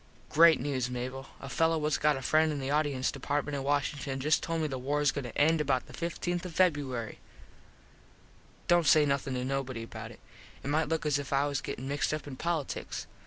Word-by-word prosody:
Great 165 +1 +6
news, 130 -2 -1
Mable. 130 +2 -5
A 135 - -8
fello 165 +3 +2
whats 150 0 0
got 150 -2 +3
a 135 - -7
friend 155 +3 +3
in 145 - -3
the 135 +1 -3
audience 145 -3 +1
department 145 +2 -2
in 140 - -2
Washington 140 -1 -1
just 150 +3 +2
told 165 0 -2
me 155 - 0
the 135 -3 -4
wars 145 +2 +1
goin 140 -1 -4
to 120 - -7
end 160 +2 +4
about 135 -4 +1
the - - -14
15th 175 +1 -3
of 180 -3 -7
Feb. 140 - +1 1.5
Dont 175 -2 +4
say 155 -1 +6
nothin 140 -2 -1
to 125 0 -2
nobody 130 -3 -2
about 115 - -8
it. - - -13 0.4
It 140 - -4
might 155 +1 +1
look 160 -1 -1
as 145 -2 +2
if 140 - -6
I 140 +1 +3
was 140 -2 -1
gettin 130 - -5
mixed 145 +2 0
up 155 - -7
in 140 -2 -7
politiks. 160 -1 -3
145 Hz, 215 wpm, -30 LUFS, 135-155 Hz, 1.5 s, Great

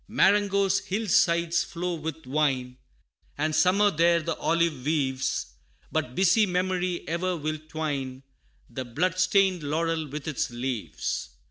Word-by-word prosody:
Marengo's 200 -1 +3
hill 210 +4 -3
sides 170 -2 +3
flow 175 +1 -4
with 160 -1 -5
wine 130 -3 0 0.6
And 155 +2 0
summer 190 +6 +4
there 170 +1 +3
the 165 +1 -3
olive 165 -5 0
weaves, 135 -3 -1 0.4
But 130 -6 -2
busy 200 +3 +4
memory 180 -1 -1
e'er 180 +3 -1
will 155 0 -3
twine 140 -5 -4 0.4
The 130 - -5
blood 165 +9 -1
stained 185 -1 +3
laurel 160 +2 -1
with 145 +1 -7
its 150 -5 -1
leaves. 120 -1 -3
165 Hz, 130 wpm, -26 LUFS, 145-185 Hz, 0.6 s, summer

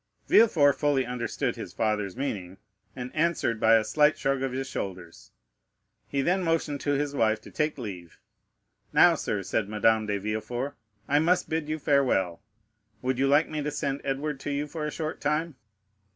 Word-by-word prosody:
Villefort 155 -11 +5
fully 145 -3 +1
understood 125 -1 -2
his - - -8
father's 105 -2 -1
meaning, 95 -9 -4 0.4
and 125 -1 -7
answered 155 -8 +1
by 110 +1 +6
a 110 - +4
slight 150 +7 +3
shrug 135 -1 0
of 135 -1 -1
his 135 +1 -3
shoulders. 90 -8 -6 0.8
He 140 -1 -1
then 185 +4 +2
motioned 165 -4 -1
to 145 - 0
his 145 0 -1
wife 110 -5 +2
to - - -13
take 150 -1 -1
leave. 95 -9 -8 0.7
"Now - - +6
sir," - - -2
said 105 -2 -1
Madame 110 +1 +2
de 100 -1 0
Villefort, 110 +6 -3 0.3
"I 145 +1 +3
must 175 +3 +2
bid 160 -1 -1
you 155 - -1
farewell. 130 - +1 0.6
Would 130 0 0
you 135 - +3
like 145 +3 +4
me 155 -1 -4
to 150 - -2
send 140 -1 -2
Edward 140 +1 -2
to 145 - -5
you 145 +1 -1
for 150 0 -4
a - - -4
short 155 0 -4
time?" 155 +2 0
135 Hz, 180 wpm, -27 LUFS, 110-150 Hz, 0.8 s, by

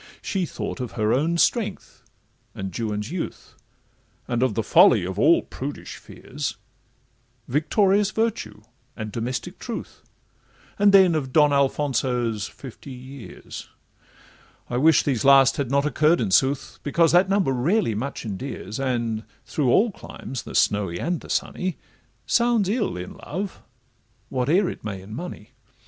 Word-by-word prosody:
She 185 -3 -1
thought - - -5
of 125 -6 -5
her 110 +1 +1
own 160 +6 +1
strength, 225 +5 0 0.5
and 95 -2 -6
Juan's 105 +1 -3
youth, 175 -2 -5 0.7
And 120 -1 -1
of 130 - +1
the 115 - 0
folly 105 -2 +5
of 95 +1 -4
all 165 +3 +5
prudish 140 +2 -7
fears, 145 +1 -6 0.9
Victorious 195 - +2
virtue, 205 - -2 0.3
and 110 -2 -5
domestic 115 +1 -4
truth, - - -7 0.8
And 205 0 +6
then 190 -3 +6
of 140 -5 -2
Don 150 0 +5
Alfonso's 125 -6 0
fifty 135 +1 -11
years: 130 0 -10 1.0
I 120 - 0
wish 155 +3 +5
these 130 -6 0
last 135 -1 +6
had 140 -4 -1
not 140 +1 +2
occurr'd, 155 +3 +3
in 105 -5 -1
sooth, 135 +6 +1
Because 165 +3 +2
that 180 +2 +4
number 195 -7 +2
rarely 135 - +1
much 130 +5 -4
endears, 110 0 -5
And 120 -4 -1 0.2
through 140 -5 0
all 220 - +4
climes, 135 -8 -8
the - - -9
snowy 100 -4 +2
and 170 - -2
the - - -13
sunny, 185 -1 -2 0.5
Sounds 235 -4 +2
ill 210 - -1
in 90 +1 -7
love, 190 +5 -5 0.7
whate'er 150 +10 +2
it - - -6
may 100 -3 -4
in 95 +3 -11
money. 130 -5 -7
135 Hz, 145 wpm, -24 LUFS, 115-170 Hz, 1.0 s, And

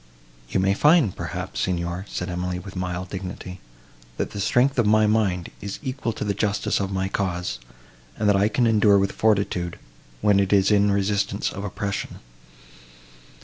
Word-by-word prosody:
"You - - 0
may 95 +1 +3
find, 150 - +4
perhaps, - - -5
Signor," 90 +1 -2
said 90 - -4
Emily, 90 0 -3
with 95 +2 -9
mild 90 0 -4
dignity, 90 -1 -6 0.6
"that - - -2
the 100 - -6
strength 125 +6 +2
of 115 - +3
my 110 0 +5
mind 105 -5 +1
is 100 0 -5
equal 130 -3 -2
to - - -5
the 105 -1 0
justice 105 +1 0
of 100 -1 -2
my 95 0 -1
cause; 90 -10 -2 0.6
and 105 - 0
that 105 - +5
I 100 +1 +3
can 120 +3 +1
endure 105 -3 +5
with 100 0 +1
fortitude, 100 -5 0 0.4
when 100 +4 +4
it 95 -1 +1
is 100 0 +4
in 105 0 +4
resistance 100 0 0
of 100 - -6
oppression." 100 0 -4
100 Hz, 170 wpm, -24 LUFS, 90-105 Hz, 0.6 s, my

